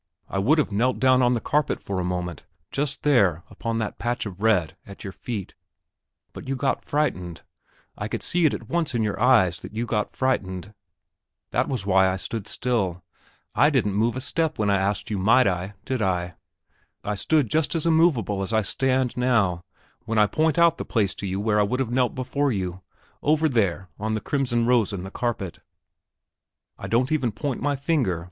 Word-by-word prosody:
I 95 Hz, -, -2 dB
would 135 Hz, +12 st, +3 dB
have 150 Hz, -, +1 dB
knelt 120 Hz, +5 st, +1 dB
down 130 Hz, 0 st, +4 dB
on 125 Hz, 0 st, +3 dB
the -, -, 0 dB
carpet 150 Hz, +6 st, 0 dB
for 95 Hz, -2 st, -4 dB
a -, -, -1 dB
moment 90 Hz, -2 st, -3 dB, 0.3 s
just 145 Hz, +1 st, -2 dB
there, 100 Hz, -, +3 dB
upon 115 Hz, -1 st, -3 dB
that 110 Hz, -2 st, -3 dB
patch 120 Hz, 0 st, -2 dB
of 100 Hz, -1 st, -8 dB
red, 100 Hz, -8 st, +2 dB
at 100 Hz, -, -12 dB
your 95 Hz, -3 st, -6 dB
feet; 105 Hz, -5 st, -6 dB, 0.8 s
but -, -, -9 dB
you 135 Hz, -, -1 dB
got 135 Hz, +1 st, -1 dB
frightened 90 Hz, -, -2 dB, 0.5 s
I -, -, -4 dB
could -, -, -4 dB
see 175 Hz, -2 st, +3 dB
it -, -, 0 dB
at 115 Hz, -, -9 dB
once 160 Hz, -4 st, -1 dB
in 115 Hz, -, +1 dB
your 105 Hz, -1 st, -2 dB
eyes 110 Hz, -9 st, +4 dB
that -, -, -10 dB
you 115 Hz, +2 st, -1 dB
got 105 Hz, -3 st, -1 dB
frightened; 100 Hz, -6 st, -1 dB, 0.8 s
that -, -, +1 dB
was 125 Hz, -8 st, -3 dB
why 95 Hz, -1 st, +4 dB
I 95 Hz, -, -1 dB
stood 105 Hz, +2 st, -5 dB
still. 95 Hz, -8 st, -1 dB, 0.5 s
I 145 Hz, -, +5 dB
didn't 120 Hz, -9 st, +1 dB
move 110 Hz, +4 st, +1 dB
a 130 Hz, -, -3 dB
step 160 Hz, +3 st, -1 dB
when 105 Hz, -1 st, +1 dB
I 100 Hz, -, +3 dB
asked 100 Hz, +2 st, -1 dB
you 100 Hz, -, -1 dB
might 115 Hz, +7 st, +5 dB
I, 95 Hz, +2 st, -1 dB
did 130 Hz, -3 st, -2 dB
I? 90 Hz, -3 st, 0 dB, 0.7 s
I 105 Hz, -, -2 dB
stood 140 Hz, +7 st, +1 dB
just 155 Hz, -1 st, +1 dB
as 165 Hz, -, 0 dB
immovable 160 Hz, -, +3 dB
as 95 Hz, -, -3 dB
I 110 Hz, -1 st, +2 dB
stand 130 Hz, +3 st, 0 dB
now 110 Hz, -9 st, +1 dB, 0.4 s
when 115 Hz, 0 st, -2 dB
I 105 Hz, -, +6 dB
point 155 Hz, +6 st, +1 dB
out 170 Hz, -1 st, +4 dB
the -, -, -2 dB
place 105 Hz, -5 st, 0 dB
to 100 Hz, -, -6 dB
you 95 Hz, +1 st, -2 dB
where 105 Hz, 0 st, +1 dB
I -, -, +5 dB
would 125 Hz, +6 st, -1 dB
have 125 Hz, -3 st, -1 dB
knelt 125 Hz, -1 st, +1 dB
before 140 Hz, +2 st, 0 dB
you, 95 Hz, -3 st, -3 dB, 0.4 s
over 155 Hz, +2 st, +3 dB
there 100 Hz, -, 0 dB
on 110 Hz, +1 st, -1 dB
the -, -, -1 dB
crimson 120 Hz, -3 st, 0 dB
rose 120 Hz, -4 st, +2 dB
in 95 Hz, -2 st, -4 dB
the 95 Hz, -, -7 dB
carpet. 110 Hz, -8 st, -3 dB, 1.2 s
I -, -, -6 dB
don't 125 Hz, +4 st, +1 dB
even 130 Hz, -7 st, +1 dB
point 125 Hz, +5 st, -3 dB
with -, -, -7 dB
my 145 Hz, 0 st, +1 dB
finger. 135 Hz, -, 0 dB
115 Hz, 205 wpm, -24 LUFS, 100-130 Hz, 1.2 s, I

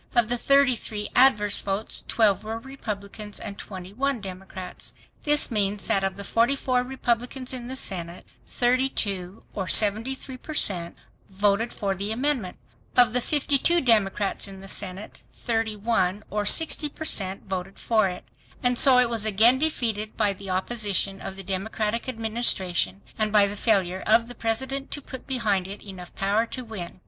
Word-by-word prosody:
Of 235 Hz, -2 st, +3 dB
the 245 Hz, -, +1 dB
33 250 Hz, -7 st, +2 dB
adverse 210 Hz, -6 st, +5 dB
votes 200 Hz, +2 st, -2 dB
12 215 Hz, -4 st, +3 dB
were 220 Hz, +1 st, -4 dB
Republicans 210 Hz, -5 st, -7 dB
and 200 Hz, -2 st, -6 dB
21 205 Hz, +9 st, -4 dB
Democrats. 190 Hz, -1 st, -8 dB, 0.3 s
This 295 Hz, -2 st, +3 dB
means 205 Hz, -2 st, 0 dB
that 195 Hz, -, +1 dB
of 195 Hz, 0 st, -1 dB
the 200 Hz, -, -7 dB
44 250 Hz, +3 st, +1 dB
Republicans 250 Hz, 0 st, -2 dB
in 245 Hz, -2 st, -5 dB
the 260 Hz, -, -5 dB
Senate, 175 Hz, -7 st, -5 dB, 0.2 s
32 225 Hz, -7 st, 0 dB
or 190 Hz, -3 st, -3 dB
73 230 Hz, +7 st, +1 dB
per 310 Hz, +4 st, -8 dB
cent 175 Hz, -9 st, 0 dB, 0.3 s
voted 205 Hz, +4 st, +1 dB
for 200 Hz, -2 st, -2 dB
the 200 Hz, +3 st, -3 dB
amendment. 250 Hz, -5 st, -1 dB, 0.4 s
Of 245 Hz, -3 st, +6 dB
the 250 Hz, -, +2 dB
52 295 Hz, +5 st, +2 dB
Democrats 210 Hz, -5 st, +2 dB
in 195 Hz, -1 st, -9 dB
the 195 Hz, -, -11 dB
Senate 195 Hz, +1 st, -6 dB
31 220 Hz, -3 st, 0 dB
or 210 Hz, 0 st, -1 dB
60 315 Hz, +1 st, +4 dB
per 315 Hz, -, -8 dB
cent 195 Hz, -8 st, 0 dB
voted 190 Hz, 0 st, -4 dB
for 215 Hz, -4 st, +2 dB
it. 180 Hz, -, -7 dB, 0.4 s
And 245 Hz, -1 st, +2 dB
so 265 Hz, -2 st, +7 dB
it 250 Hz, -1 st, +5 dB
was 230 Hz, -2 st, 0 dB
again 225 Hz, +5 st, +5 dB
defeated 225 Hz, -8 st, -1 dB
by 200 Hz, -, +2 dB
the 195 Hz, 0 st, -10 dB
opposition 195 Hz, 0 st, 0 dB
of 195 Hz, -1 st, -6 dB
the 195 Hz, -, -8 dB
Democratic 210 Hz, +5 st, -2 dB
Administration, 215 Hz, -, 0 dB, 0.2 s
and 215 Hz, -1 st, +1 dB
by 205 Hz, -1 st, +6 dB
the 200 Hz, +1 st, -3 dB
failure 190 Hz, -4 st, +1 dB
of 230 Hz, +2 st, +4 dB
the 245 Hz, -, -8 dB
President 265 Hz, +5 st, -2 dB
to 290 Hz, -, -3 dB
put 260 Hz, -2 st, -9 dB
behind 210 Hz, -8 st, 0 dB
it 200 Hz, +1 st, -8 dB
enough 185 Hz, -3 st, -10 dB
power 205 Hz, +4 st, +1 dB
to 255 Hz, +1 st, -7 dB
win. 185 Hz, -6 st, -7 dB
215 Hz, 160 wpm, -25 LUFS, 195-245 Hz, 0.4 s, so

